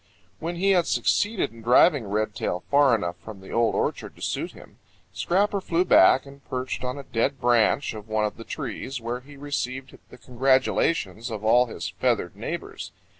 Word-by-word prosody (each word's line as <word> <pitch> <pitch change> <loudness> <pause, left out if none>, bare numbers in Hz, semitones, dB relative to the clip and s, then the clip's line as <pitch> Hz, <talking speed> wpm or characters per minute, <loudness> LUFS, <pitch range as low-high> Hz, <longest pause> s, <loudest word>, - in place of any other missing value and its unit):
When 170 +2 -4
he 195 +3 +2
had 180 -3 +3
succeeded 205 - +1
in 115 - -13
driving 125 - +4
Redtail 105 -3 -2
far 140 -3 +5
enough 90 -5 -3
from 105 +2 -11
the 95 - -12
Old 115 -2 +2
Orchard - - -2
to - - -18
suit - - -3
him, - - -16 0.3
Scrapper 200 +3 +1
flew 180 -1 +1
back 130 - +6
and 140 0 -14
perched 130 0 -3
on 125 +2 -3
a 140 - -7
dead 130 +3 -1
branch 120 +2 +2
of 105 -1 -9
one 110 -1 0
of 105 - -3
the 115 - -10
trees, 135 0 -5
where 120 +2 -4
he 140 +3 -15
received 135 -2 -4
the - - -13
congratulations 125 - +1
of 110 -2 -5
all 125 +3 +5
his - - -5
feathered - - -1
neighbors. - - -6
125 Hz, 180 wpm, -25 LUFS, 110-145 Hz, 0.3 s, back